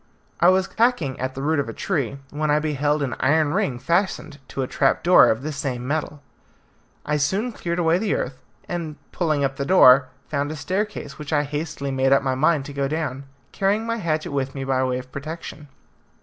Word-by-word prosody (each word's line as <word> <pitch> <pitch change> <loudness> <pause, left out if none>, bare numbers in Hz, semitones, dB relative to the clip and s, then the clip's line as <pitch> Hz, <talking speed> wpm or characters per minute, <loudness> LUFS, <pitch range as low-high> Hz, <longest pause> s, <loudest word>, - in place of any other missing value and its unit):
I - - +6
was 190 +1 +3
hacking 225 - +2
at 130 +1 -3
the 135 - -5
root 155 +1 +1
of 140 - -2
a - - -5
tree, 140 - -1
when 150 +1 -2
I 150 - +4
beheld 150 -1 0
an 135 - -2
iron 150 +2 +2
ring 190 - 0
fastened 170 0 -1
to 135 - -3
a - - -3
trapdoor 170 +8 +4
of 110 +4 0
the 155 - -3
same 135 -4 -4
metal. 150 0 -3 0.8
I 150 0 0
soon 195 +12 0
cleared 170 -5 -4
away 170 0 +2
the 210 0 0
earth, 130 0 -4 0.3
and 165 -3 -4 0.2
pulling 155 -5 0
up 135 0 -1
the 140 - -1
door, 135 -5 +6 0.2
found 145 -1 -1
a - - -5
staircase, 185 -2 -3
which 150 0 -7
I 145 -1 +2
hastily 145 -1 -4
made 135 0 +3
up 135 - +3
my 130 -1 0
mind 145 +1 +2
to 145 - -8
go 140 -1 -1
down, 140 -3 -3 0.3
carrying 205 +3 0
my 230 0 -1
hatchet 155 -7 -2
with 135 -1 -2
me 135 - -4
by 130 -1 +1
way 130 -1 0
of 130 0 -9
protection. 150 +1 -7
145 Hz, 205 wpm, -23 LUFS, 135-170 Hz, 0.8 s, I